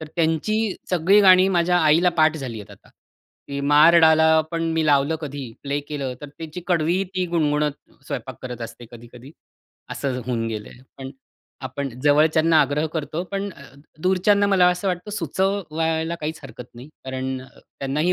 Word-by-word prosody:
तर 155 - -7
त्यांची 185 +6 0 0.2
सगळी 185 +4 +4
गाणी 185 -1 +6
माझ्या 175 -1 +2
आईला 160 +2 +4
पाठ 155 0 +4
झाली 125 -6 -6
आहेत 105 0 -13
आता. 100 - -17 0.6
ती 140 0 -4
मार 150 +4 +5
डाला 160 0 +5
पण 165 -1 -2
मी 160 -1 0
लावलं 145 +2 +2
कधी, 140 -5 -7
प्ले 140 0 -2
केलं, 140 -4 -4
तर 145 - -8
त्याची 160 +4 -9
कडवी 175 +1 +1
ती 185 -1 0
गुणगुणत 150 -3 0 0.3
स्वयंपाक 130 -3 -6
करत 125 -2 -7
असते 115 +1 -9
कधी-कधी, 120 +2 -13 0.6
असं 130 -2 -3
होऊन 115 -2 -2
गेलंय. 110 +1 -7 0.2
पण 135 0 -7 0.6
आपण 135 +2 -5
जवळच्यांना 155 +2 +4
आग्रह 145 +2 0
करतो, 155 +1 -3
पण 200 +1 -3
अ, 140 - -15 0.4
दूरच्यांना 195 +2 +3
मला 190 -3 +4
असं 180 +2 -1
वाटतं, 180 +3 -4
सुचवायला 165 -3 -1
काहीच 155 +1 -4
हरकत 125 -2 -11
नाही. 125 +4 -11 0.2
कारण 130 0 -4
अ, 130 - -14
त्यांना 135 +2 -5
ही 180 +3 +2
155 Hz, 165 wpm, -22 LUFS, 135-175 Hz, 0.6 s, गाणी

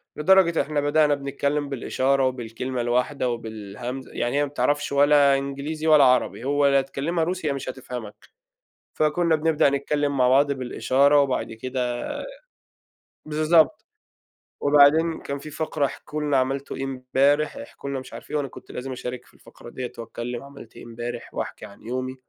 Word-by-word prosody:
لدرجة 170 +1 +4
إحنا 145 +1 -1
بدأنا 145 0 +3
بنتكلم 140 +1 -2
بالإشارة 135 0 +1
وبالكلمة 125 0 -4
الواحدة 125 +2 0
وبالهمزة 115 +2 -6
يعني 120 +3 -1
هي 145 - +3
ما - - -7
بتعرفش 145 0 0
ولا 140 -1 +5
إنجليزي 140 +3 -4
ولا 155 -3 +7
عربي، 125 -2 +2
هو 145 +1 +2
لا 140 0 +4
تكلّمها 145 +5 -2
روسي 180 -1 -2
يا 140 - +1
مش 135 -1 -5
هتفهمك. 125 -4 -7 0.8
فكُنّا 160 +2 +2
بنبدأ 155 -2 +2
نتكلم 140 +1 -1
مع 125 -1 +4
بعض 140 +2 +4
بالإشارة 135 +2 +2
وبعد 135 -4 -2
كده 125 +1 -3 1.2
بالضبط. 155 0 +3 0.8
وبعدين 150 +3 +5
كان 140 - -4
في 155 - -9
فقرة 155 -1 -1
احكوا 150 +2 -5
لنا 145 -2 +1
عملتوا 135 +2 -1
إيه - - -3
إمبارح، 135 +3 +1
احكوا 140 - -8
لنا 140 -1 -2
مش 130 - -12
عارف - - -10
إيه، 150 - 0
وأنا 145 -2 -2
كنت - - -13
لازم 130 +2 -6
أشارك 125 -1 -6
في - - -23
الفقرة - - -14
دِيّة 125 +1 -6
وأتكلم 120 +1 -6
عملت 140 -4 -13
إيه - - -11
إمبارح 120 +1 -7
وأحكي - - -5
عن 100 - -15
يومي. 130 +2 -4
140 Hz, 160 wpm, -24 LUFS, 125-145 Hz, 1.2 s, ولا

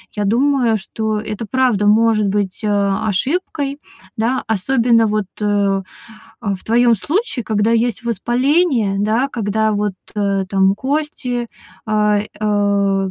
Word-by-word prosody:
я 210 -1 -1
думаю, 245 +1 +2
что 215 +2 -3
это 215 +1 -5
правда 245 -5 +2
может 215 -1 +3
быть, 200 0 -2
а, 200 0 0
ошибкой, 280 - -2 0.4
да, 235 +4 0
особенно 230 +2 +2
вот, 210 -1 0 0.2
э, - - 0 1.0
а, 205 -4 -1
в 185 - -10
твоём 235 +1 +4
случае, 305 - -2
когда 215 +1 +1
есть 235 +1 0
воспаление, 240 - +1
да, 220 +6 +1
когда 220 -3 0
вот, 205 -1 -1 0.2
э, 200 -2 0
там 195 0 +3
кости, 260 -3 -2 0.4
а, 210 -1 +2
э, 200 -2 0
220 Hz, 130 wpm, -18 LUFS, 205-245 Hz, 1.0 s, твоём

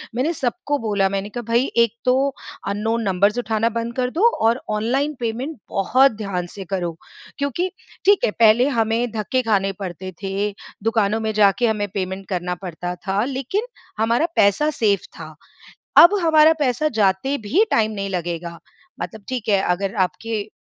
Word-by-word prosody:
मैंने 275 +8 0
सबको 290 +1 -2
बोला। 205 -3 +1
मैंने 195 +1 -3
कहा 240 +3 -5
भई, 240 +3 +4
एक 235 -2 +4
तो 265 +2 +2 0.3
अननोन 220 +3 -1
नंबर्स 200 +3 +2
उठाना 225 -1 0
बंद 230 +1 -4
कर 250 -1 0
दो 380 - +3 0.2
और 235 +3 +1
ऑनलाइन 250 +8 0
पेमेंट 245 +6 -3
बहुत 255 +8 +3
ध्यान 190 -4 -3
से 195 +2 -9
करो। 175 -3 -3 0.4
क्योंकि 280 +6 -1 0.4
ठीक 405 0 +5
है, 210 - 0
पहले 230 +3 +4
हमें 230 -1 0
धक्के 225 +4 -1
खाने 195 -3 +1
पड़ते 185 -1 -6
थे, 200 +2 -2 0.3
दुकानों 220 -1 +1
में 220 -1 -1
जाके 210 +3 +3
हमें 210 -2 0
पेमेंट 190 0 -4
करना 180 -1 -2
पड़ता 180 -1 -5
था, 195 +2 -1
लेकिन 275 - -2 0.3
हमारा 230 +7 +2
पैसा 200 +10 +3
सेफ़ 205 -10 +1
था। 155 -1 -9 0.6
अब 345 +4 +9
हमारा 315 -1 +6
पैसा 290 +2 +1
जाते 210 +7 +1
भी 290 - +2
टाइम 220 -1 +2
नहीं 200 -2 -4
लगेगा। 170 -2 -4 0.4
मतलब 220 -2 -6
ठीक 255 -4 -4
है, 200 -2 +3
अगर 195 +2 -1
आपके 215 +4 -5
220 Hz, 165 wpm, -21 LUFS, 195-250 Hz, 0.6 s, अब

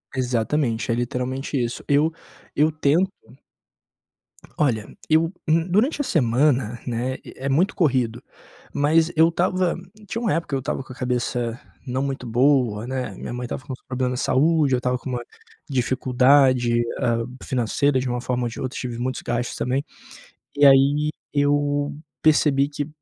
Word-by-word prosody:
Exatamente, 120 -1 0
é - - +2
literalmente 125 +3 -2
isso. 120 0 -4
Eu 150 +3 +3 0.4
eu 155 +2 +3
tento 155 +5 +2 1.5
Olha, 115 -8 +1 0.2
eu 160 +2 +3 0.2
hum, 165 +2 +2
durante 250 - +2
a - - 0
semana, 125 - +1
né, 125 +1 -2
eh, 135 - -10
é - - 0
muito 170 +9 +2
corrido, 125 -8 +1 0.5
mas 160 +3 +3
eu 165 +1 +5
estava 180 +1 0 0.3
tinha 230 - -3
uma 225 - +1
época, 165 -4 -2
eu - - 0
estava 135 0 -3
com 130 - -13
a - - -14
cabeça 125 -1 -2 0.3
não 130 +2 -1
muito 135 -2 -4
boa, 120 -3 +2
né, 130 -1 -4
minha - - -6
mãe 125 0 -4
estava 130 - -5
com 140 - -8
uns - - -10
problemas 125 -1 -1
de - - -1
saúde, 150 0 +3
eu - - +4
estava 125 0 0
com 130 - -8
uma 120 -1 -3 0.5
dificuldade, 130 -1 +3 0.2
hum, 120 +2 -1
financeira 130 +2 +1
de 125 0 -2
uma 120 0 -1
forma 125 -1 -1
ou 120 - -1
de - - -9
outra, 130 0 -4
tive 120 -2 -4
muitos 130 +1 -3
gastos 120 0 -2
também. 135 +3 -1 0.7
E 145 0 +5
aí, 140 +2 +5 0.2
eu 145 0 +1 0.3
percebi 145 -3 +4
que: 145 0 -4
130 Hz, 165 wpm, -23 LUFS, 125-150 Hz, 1.5 s, eu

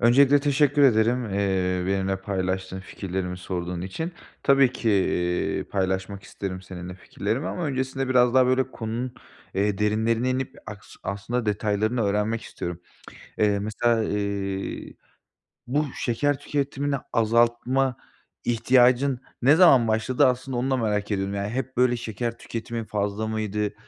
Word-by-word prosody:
Öncelikle, 135 +4 +5
teşekkür 145 0 +3
ederim, 120 0 +4
eee, 95 -2 0
benimle 95 0 0
paylaştığın, 95 -1 -3
fikirlerimi 95 -2 -4
sorduğun 90 -1 -4
için. 130 - -4 0.3
Tabii 135 -2 +5
ki, 115 -3 0
iii, 90 -3 0
paylaşmak 95 +1 -2
isterim 95 -2 -6
seninle 90 -1 -8
fikirlerimi 115 +7 -3
ama 175 - -3
öncesinde 130 0 -2
biraz 125 -1 +4
daha, 130 -1 +6
böyle, 130 +1 +1
konunun, 120 +3 -4 0.4
eee, 100 +1 0
derinlerine 110 +4 +1
inip 130 0 -2
aks 105 -1 -10
aslında 110 +4 -3
detaylarını 105 +3 0
öğrenmek 105 +3 0
istiyorum. 85 0 -6 0.6
Eee, 105 -1 +3
mesela, 110 +2 +1
iii, 100 -2 -3 0.7
bu 145 +5 +1
şeker 135 +4 0
tüketimini 145 0 -2 0.2
azaltma 120 +3 +2 0.5
ihtiyacın 125 +2 +3 0.2
ne 140 +5 +6
zaman 135 -10 +6
başladı 115 +6 +2
aslında 130 0 -1
onu 130 +2 0
da 130 - +2
merak 105 -4 -1
ediyorum. 100 -1 -1
Yani, 100 0 -2
hep, 130 +2 -4
böyle, 125 0 +3
şeker 115 0 -4
tüketimin 115 0 -5
fazla 105 0 -2
mıydı? 105 -1 -2
110 Hz, 135 wpm, -25 LUFS, 100-130 Hz, 0.7 s, daha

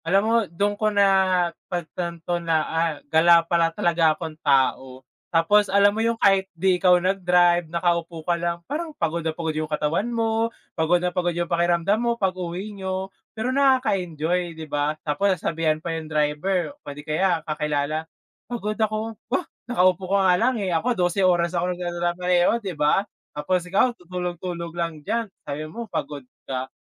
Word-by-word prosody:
Alam 195 +4 +3
mo, 225 +1 +2
do'n 200 +5 0
ko 215 - +3
napagtanto 175 -3 0
na, 165 -1 +1
ah, 165 0 0 0.2
gala 170 +1 +6
pala 170 -1 +2
talaga 165 -1 +2
akong 160 -2 -6
tao. 130 -2 +1 0.3
Tapos 195 +5 +3
alam 200 +1 +5
mo 220 - -1
yung 230 0 +1
kahit 195 -1 +3
di 185 +2 +3
ikaw 180 -1 +6
nag-drive, 175 -2 +2
nakaupo 170 -1 -1
ka 175 - +3
lang 170 0 -2
parang 315 +3 -3
pagod 170 +1 -1
na 160 - 0
pagod 160 0 -3
yung 155 0 -2
katawan 155 +8 -1
mo, 225 0 0 0.3
pagod 160 +2 +3
na 180 0 -2
pagod 175 -1 +1
yung 175 0 -1
pakiramdam 175 +5 +1
mo 235 0 0
pag-uwi 185 +1 -3
nyo 190 -1 -3 0.2
pero 220 +1 -4
nakaka-enjoy, 180 - +1
di 160 - -7
ba? 145 0 0 0.2
Tapos 170 +7 +2
sasabihan 160 -2 0
pa 165 +1 -4
yung 160 -1 -6
driver, 155 - 0
o 285 - -10
di 140 - -10
kaya 170 +3 +1
kakilala, 150 0 -1 0.5
"pagod 215 -3 -3
ako," 220 0 -2 0.2
"oh, 295 +7 0 0.3
nakaupo 185 -4 +3
ka 200 - +4
nga 180 - +5
lang, 250 +7 +2
eh, 190 -3 -1
ako 235 +8 0
12 180 +2 +1
oras 175 -1 +2
ako 180 +1 0
nag - - -14
mamaneho 175 +2 +1
di 195 -5 -5
ba? 150 +7 +2 0.3
tapos 170 +5 -1
ikaw 195 +7 +1
tutulog-tulog 175 -2 -5
lang 165 -2 -3
diyan 230 0 0 0.2
sabi 145 +1 -4
mo 225 +10 -7
pagod 145 -8 -5 0.2
ka" 130 -1 -4
175 Hz, 170 wpm, -24 LUFS, 165-195 Hz, 0.5 s, gala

